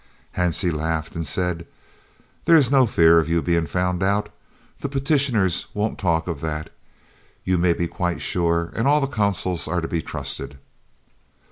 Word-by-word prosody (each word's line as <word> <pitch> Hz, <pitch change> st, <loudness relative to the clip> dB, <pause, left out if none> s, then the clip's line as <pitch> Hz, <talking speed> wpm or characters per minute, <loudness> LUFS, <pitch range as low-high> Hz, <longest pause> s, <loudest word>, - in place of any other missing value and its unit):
'" -, -, -32 dB
Hansie 90 Hz, -1 st, +1 dB
laughed 80 Hz, +1 st, -2 dB
and 85 Hz, -2 st, -4 dB
said, 90 Hz, +1 st, -2 dB, 0.8 s
"There 165 Hz, -, +6 dB
is 140 Hz, -5 st, +4 dB
no 135 Hz, -3 st, +5 dB
fear 85 Hz, -4 st, +5 dB
of 80 Hz, -1 st, -1 dB
your 85 Hz, 0 st, +1 dB
being 85 Hz, -1 st, +1 dB
found 90 Hz, 0 st, -1 dB
out. 100 Hz, +2 st, +1 dB, 0.5 s
The 140 Hz, -, -4 dB
petitioners 135 Hz, -, +1 dB
won't 105 Hz, +1 st, -2 dB
talk 80 Hz, -4 st, +1 dB
of 80 Hz, -5 st, -5 dB
that, 75 Hz, -1 st, -4 dB, 0.7 s
you 90 Hz, -1 st, +1 dB
may 85 Hz, 0 st, +3 dB
be 85 Hz, -, -2 dB
quite 90 Hz, 0 st, -2 dB
sure, 85 Hz, -1 st, 0 dB
and 115 Hz, -, 0 dB
all 145 Hz, +1 st, +4 dB
the 140 Hz, -, 0 dB
Consuls 100 Hz, -8 st, 0 dB
are 90 Hz, -, 0 dB
to 80 Hz, -, -3 dB
be 85 Hz, -, -2 dB
trusted." 70 Hz, -, -4 dB
90 Hz, 170 wpm, -22 LUFS, 85-105 Hz, 0.8 s, There